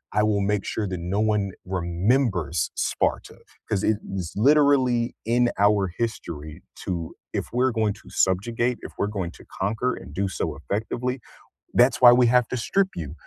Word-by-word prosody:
I 105 - +4
will 105 -2 +2
make 100 0 0
sure 110 - -2
that 90 - -4
no 90 +5 -1
one 105 -3 +1
remembers 90 - 0
Sparta." - - -1 0.3
'Cause 100 -2 0
it 110 - +2 0.2
is 90 -4 -4
literally 130 -1 +3
in 120 +2 +3
our 100 -1 +3
history 80 -9 -4 0.2
to 85 -3 -4 0.2
if - - -2
we're 130 +1 +2
going 110 -3 0
to - - -16
subjugate, 115 +6 +1
if - - -8
we're 100 - 0
going 95 -5 -3
to - - -16 0.2
conquer 110 +6 0
and - - -11
do 95 +4 -1
so 95 - -3
effectively, 115 - -3 0.6
that's 125 +2 +4
why 120 - +10
we 125 0 +5
have 125 0 +4
to 130 - -3
strip 190 +11 +1
you 80 -4 -5
105 Hz, 170 wpm, -24 LUFS, 95-120 Hz, 0.6 s, why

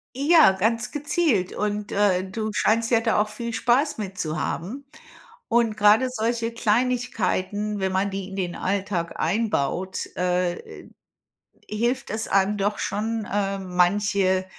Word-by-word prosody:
Ja, 295 - +6
ganz 225 +5 0
gezielt. 295 - 0
Und, 210 0 -2
äh, 195 -3 +2
du 215 +1 -3
scheinst 225 +3 +1
ja 230 -1 +4
da 225 -2 +1
auch 210 - +1
viel 235 +1 -5
Spaß 260 +6 +2
mit 195 -3 -6
zu 155 -2 -2
haben. 215 - -4 0.6
Und 230 -2 +2
gerade 210 +5 +5
solche 230 0 -1
Kleinigkeiten, 215 -3 0
wenn 190 -1 -1
man 195 +1 0
die 195 0 -5
in 195 - -8
den 180 -2 -2
Alltag 185 -3 -2
einbaut, 190 -4 -1
äh, 180 -1 -2 0.8
hilft 240 +5 -1
es 220 +1 -3
einem 195 +1 +2
doch 205 +1 0
schon, 220 +1 -2
ähm, 195 -2 -2
manche 190 0 +2
210 Hz, 140 wpm, -24 LUFS, 190-230 Hz, 0.8 s, Ja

